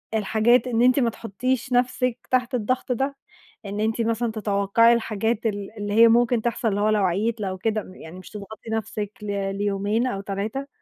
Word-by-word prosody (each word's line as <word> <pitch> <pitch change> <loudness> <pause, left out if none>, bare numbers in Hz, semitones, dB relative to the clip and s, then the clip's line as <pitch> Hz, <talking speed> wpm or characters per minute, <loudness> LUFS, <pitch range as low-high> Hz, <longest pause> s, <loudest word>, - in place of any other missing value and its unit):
الحاجات 220 +4 +3
إن 235 -1 +1
أنتِ 255 +2 +5
ما 235 -2 +2
تحطيش 250 +4 -3
نَفسِك 250 0 +1
تحت 255 0 +1
الضغط 250 +3 -1
ده؟ 270 +3 -1 0.5
إن 200 +1 -4
أنتِ 220 +2 0
مثلًا 230 0 0
تتوقعي 215 +2 +3
الحاجات 225 0 -1
ال 205 +1 -5
اللي 205 0 -3
هي 230 +1 +7
ممكن 235 0 +3
تحصل، 235 0 -1
اللي 205 0 -1
هو 215 - +3
لو 210 -2 +2
عييت 215 +5 0
لو 190 -1 -3
كده 215 +2 -1
م 185 - -13
يعني 170 +3 -11
مش - - -12
تضغطي 215 +2 -9
نَفسِك 215 -1 -3
ل 200 -1 -2
ليومين 205 +4 0
أو 195 -5 -3
3. 210 +8 -4
220 Hz, 190 wpm, -24 LUFS, 205-240 Hz, 0.5 s, هي